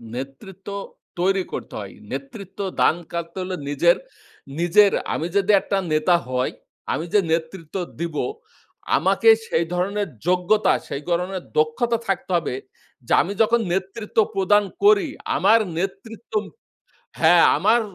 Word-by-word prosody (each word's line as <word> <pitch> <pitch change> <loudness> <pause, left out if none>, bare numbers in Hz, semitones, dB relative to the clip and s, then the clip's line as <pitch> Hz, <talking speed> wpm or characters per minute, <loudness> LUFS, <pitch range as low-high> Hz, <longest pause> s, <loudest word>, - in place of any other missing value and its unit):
নেতৃত্ব 135 +10 -9 0.5
তৈরি 190 +1 +2
করতে - - -6
হয়। - - -8 0.2
নেতৃত্ব 220 -9 -8 0.2
দান - - +5 0.2
কাটতে 170 +1 -5
হলে 185 0 -4
নিজের 170 +4 +4 0.6
নিজের 195 +4 +5 0.2
আমি 165 - -2
যদি 200 +1 +3
একটা 195 - -1 0.2
নেতা 155 +3 +3
হয়, 125 0 0 0.4
আমি 165 - -2
যে 210 - +6
নেতৃত্ব 165 0 -3 0.2
দিবো 170 -3 -2 0.7
আমাকে 455 - +3 0.2
সেই 170 - +1
ধরনের 200 +3 -1 0.2
যোগ্যতা, 185 +4 +3
সেই 140 - -4
ধরনের 180 +1 -1
দক্ষতা 195 +11 +2
থাকতে 195 -1 -2
হবে। 145 -6 -3 0.5
যে - - +1
আমি 200 - -3
যখন 230 +2 +4
নেতৃত্ব 195 +4 -4 0.2
প্রদান 205 +2 +4 0.2
করি, 405 -5 +5 0.3
আমার 230 -6 +5 0.2
নেতৃত্ব 195 +5 -6 0.9
হ্যাঁ, - - +6
আমার 235 +2 +3
190 Hz, 125 wpm, -22 LUFS, 170-210 Hz, 0.9 s, যে